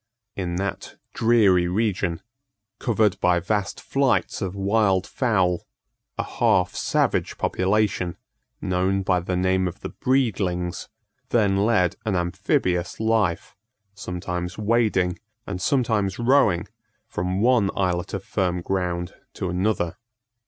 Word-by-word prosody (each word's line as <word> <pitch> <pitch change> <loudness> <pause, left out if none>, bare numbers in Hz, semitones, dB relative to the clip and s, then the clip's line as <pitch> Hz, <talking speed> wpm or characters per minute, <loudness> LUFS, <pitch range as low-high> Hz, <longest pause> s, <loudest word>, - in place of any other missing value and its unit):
In 90 -3 -3
that 100 +1 -4 0.2
dreary 105 -7 +4
region, 90 -4 -1 0.6
covered 110 -5 +1
by 90 -1 +3
vast 100 +3 -2
flights 135 -4 0
of 95 -1 -3
wild 100 -1 +2
fowl, 95 -9 0 0.5
a - - 0
half 90 -1 +1
savage - - 0
population, 95 -2 0 0.4
known 95 +1 0
by 90 -1 +2
the 90 +1 -3
name 95 0 +2
of 90 - -7
the - - -5
Breedlings, 100 -9 -1 0.4
then 105 -5 +3
led 100 -4 +2
an 110 -3 -1
amphibious 90 0 0
life, 110 -6 0 0.4
sometimes 90 -2 -5
wading, 105 -5 +1 0.3
and 95 -2 -5
sometimes 110 -7 +1
rowing, 120 -8 +3 0.4
from 90 +2 -2
one 115 -3 +3
islet 90 -2 -1
of - - -5
firm 90 -2 -1
ground 90 -2 -2 0.2
to 90 - -3
another. 90 -2 0
95 Hz, 115 wpm, -24 LUFS, 90-110 Hz, 0.6 s, dreary